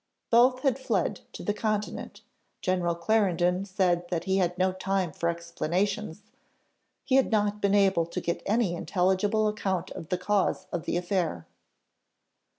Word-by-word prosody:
Both 250 +2 +5
had 270 -2 +1
fled 265 - -1
to - - -8
the 205 - 0
Continent. 210 0 -3 0.4
General 180 -2 0
Clarendon 180 -1 +1
said 180 -3 0
that 170 -2 -1
he 190 +1 +1
had 180 -1 0
no 185 +1 +2
time 185 -2 -1
for 170 +3 -1
explanations, 175 +3 -2 0.8
he 265 - +3
had 270 - +3
not 210 -1 +1
been 200 0 +3
able 195 -4 +3
to - - -4
get 170 - -2
any 210 -3 +2
intelligible 190 +4 +1
account 195 -4 -2
of 160 - -8
the 180 - 0
cause 190 0 0
of 170 -2 -3
the - - 0
affair. 175 - -1
190 Hz, 155 wpm, -28 LUFS, 175-210 Hz, 0.8 s, Both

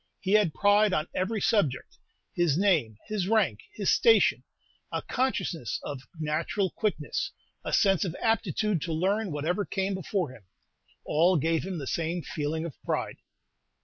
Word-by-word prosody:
He 190 - -3
had 205 -7 +4
pride 205 0 +4
on 155 0 0
every 210 +4 -1
subject. 175 - 0 0.3
His 170 -4 +2
name, 160 - +2
his 210 -4 -2
rank, 220 +1 +2 0.2
his - - +1
station, 460 -1 +4 0.5
a - - -2
consciousness 195 - -1
of 140 -3 -5 0.2
natural 160 +5 -1
quickness, 200 -9 -2 0.3
a - - -4
sense 195 -3 +3
of 180 -3 -3
aptitude 215 -4 0
to 165 0 -3
learn 195 +5 0
whatever 160 +7 -1
came 195 0 -2
before 185 -4 -2
him, 115 -6 -15 0.6
all 175 +4 +3
gave 160 +2 +1
him 190 -2 -4
the 145 - -5
same 165 +4 -2
feeling 155 +2 -3
of 165 - -8
pride. - - -2
180 Hz, 150 wpm, -28 LUFS, 155-205 Hz, 0.6 s, had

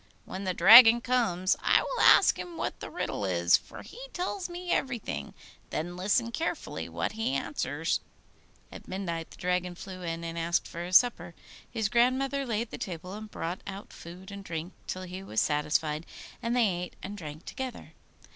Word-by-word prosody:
When 195 +1 -6
the 185 - 0
Dragon 225 +5 +10
comes, 225 -8 +1
I - - +5
will - - -2
ask - - +7
him 345 -2 -7
what - - -3
the - - -7
riddle 330 - -3
is, 85 -2 +4
for - - -5
he - - -11
tells 365 +1 -3
me 350 0 -5
everything; 255 -4 -2 0.3
then 175 +3 -3
listen 205 +6 +1
carefully 325 +8 -3
what - - -2
he 220 -10 -2
answers.' 145 +4 -1 0.7
At - - -11
midnight 170 -4 -4
the - - -14
Dragon 180 0 -1
flew 185 +1 -9
in, 165 -1 -4
and 165 0 -4
asked 170 +1 0
for 170 - -6
his 180 +1 +7
supper. 175 -9 0 0.3
His 225 -3 -1
grandmother 260 +4 +2
laid 230 0 -2
the - - -7
table, 180 0 -6
and 215 +1 -8
brought 175 -2 -4
out 195 +1 -8
food 180 +3 -11
and 200 0 -8
drink 165 0 -5
till 185 - -4
he 185 +1 -7
was 110 - -2
satisfied, 150 +1 0 0.3
and 235 +1 -1
they 240 -3 +4
ate 180 -1 -6
and 200 +2 -5
drank 155 -4 -8
together. 260 -1 -6
185 Hz, 180 wpm, -29 LUFS, 170-235 Hz, 0.7 s, Dragon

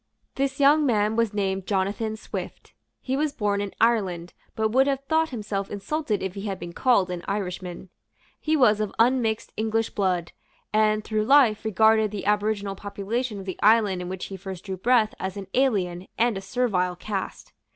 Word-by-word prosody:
This 275 0 -2
young 290 +2 +5
man 215 -5 +2
was 230 -2 +1
named 195 -2 -2
Jonathan 205 +3 -1
Swift. - - -7 0.3
He 260 - -2
was 300 +1 0
born 205 -2 0
in 200 -1 -4
Ireland, 190 -7 +1 0.2
but 220 0 +1
would 265 +3 +4
have 275 -1 -1
thought 320 +2 +1
himself 205 -5 -4
insulted 215 +2 -2
if 190 -1 -3
he 200 - -6
had 195 -1 -3
been 175 -1 -8
called 200 -7 +2
an 175 -1 -5
Irishman. 185 -2 -4 0.5
He 315 0 +1
was 215 -6 +4
of 210 - -2
unmixed 230 -2 +1
English 225 +1 0
blood, 185 -4 -1 0.4
and, 215 0 +3
through 215 -1 -1
life, 250 -5 +5
regarded 220 0 +3
the 205 -1 -6
aboriginal 205 -1 0
population 205 +4 -4
of 195 - -7
the 185 - -6
island 210 -4 +4
in 180 - -5
which 190 0 -5
he 195 - -7
first 190 -1 -8
drew 190 -2 -4
breath 225 +2 +3
as 190 +1 -4
an 200 - -5
alien 190 -9 0
and 235 -1 +2
a 195 - -4
servile 190 -4 0
caste. 195 +1 -5
210 Hz, 180 wpm, -25 LUFS, 190-230 Hz, 0.5 s, young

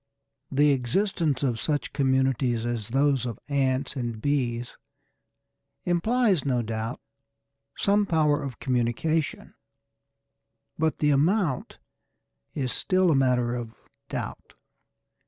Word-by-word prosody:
The 145 +2 +4
existence 145 - 0
of 120 -4 0
such 150 -2 -1
communities 130 -3 +1
as 120 -3 -2
those 135 0 +2
of 120 -4 -4
ants 135 -1 0
or 130 - -2
bees 120 0 -2 1.1
implies, 195 - +2
no 125 -4 0
doubt, 110 0 -4 0.8
some 205 0 +2
power 155 -3 +2
of 135 -5 -6
communication, 130 +5 -1 1.2
but 160 0 0
the 150 -1 +2
amount 155 - +1 0.8
is 130 -4 -1
still 185 -2 +2
a - - +3
matter 125 -3 +2
of 115 -2 -5 0.3
doubt. - - -6
135 Hz, 105 wpm, -26 LUFS, 120-155 Hz, 1.2 s, The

